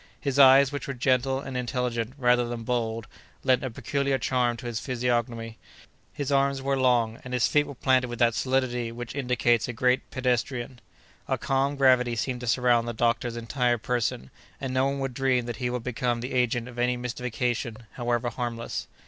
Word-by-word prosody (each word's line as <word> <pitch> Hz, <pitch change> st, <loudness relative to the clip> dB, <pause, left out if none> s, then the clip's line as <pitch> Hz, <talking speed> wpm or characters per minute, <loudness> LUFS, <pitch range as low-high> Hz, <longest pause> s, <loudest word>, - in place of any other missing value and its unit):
His 140 Hz, -1 st, -1 dB
eyes, 135 Hz, 0 st, +8 dB
which 145 Hz, -, -5 dB
were 135 Hz, -, -4 dB
gentle 130 Hz, +1 st, +1 dB
and 135 Hz, -2 st, -7 dB
intelligent, 125 Hz, -2 st, -2 dB
rather 125 Hz, -2 st, +3 dB
than 120 Hz, -1 st, -5 dB
bold, 115 Hz, -2 st, -2 dB, 0.4 s
lent 130 Hz, 0 st, +3 dB
a 130 Hz, -, -2 dB
peculiar 140 Hz, +4 st, -1 dB
charm 125 Hz, -3 st, 0 dB
to 120 Hz, -, -10 dB
his 120 Hz, -2 st, -3 dB
physiognomy. 120 Hz, -3 st, -2 dB, 0.5 s
His 145 Hz, -2 st, -4 dB
arms 140 Hz, 0 st, +2 dB
were 135 Hz, +1 st, 0 dB
long, 120 Hz, -4 st, +2 dB
and 125 Hz, 0 st, -4 dB
his 125 Hz, -, +3 dB
feet 145 Hz, -1 st, +2 dB
were 140 Hz, -, -8 dB
planted 130 Hz, 0 st, +2 dB
with 120 Hz, 0 st, -6 dB
that 115 Hz, -1 st, +3 dB
solidity 125 Hz, -2 st, 0 dB
which 120 Hz, 0 st, -7 dB
indicates 125 Hz, -4 st, +1 dB
a 125 Hz, -, -4 dB
great 125 Hz, +2 st, +1 dB
pedestrian. 125 Hz, -1 st, -2 dB, 0.5 s
A -, -, 0 dB
calm 135 Hz, +1 st, 0 dB
gravity 130 Hz, -3 st, +4 dB
seemed 125 Hz, +2 st, -2 dB
to 125 Hz, -, -6 dB
surround 120 Hz, -1 st, +3 dB
the 120 Hz, -, -2 dB
doctor's 120 Hz, +1 st, 0 dB
entire 120 Hz, +1 st, 0 dB
person, 115 Hz, -, -2 dB, 0.3 s
and 135 Hz, -2 st, -4 dB
no 130 Hz, +1 st, +2 dB
one 140 Hz, 0 st, -2 dB
would 135 Hz, -2 st, -2 dB
dream 130 Hz, -1 st, +1 dB
that 120 Hz, -2 st, -5 dB
he 125 Hz, +1 st, -1 dB
could 125 Hz, -1 st, -3 dB
become 120 Hz, -1 st, -1 dB
the 125 Hz, +2 st, -5 dB
agent 125 Hz, -1 st, +1 dB
of 125 Hz, -1 st, -9 dB
any 125 Hz, 0 st, +1 dB
mystification, 120 Hz, -2 st, -2 dB
however 120 Hz, -1 st, -1 dB
harmless. 115 Hz, -1 st, -4 dB
125 Hz, 190 wpm, -26 LUFS, 120-130 Hz, 0.5 s, eyes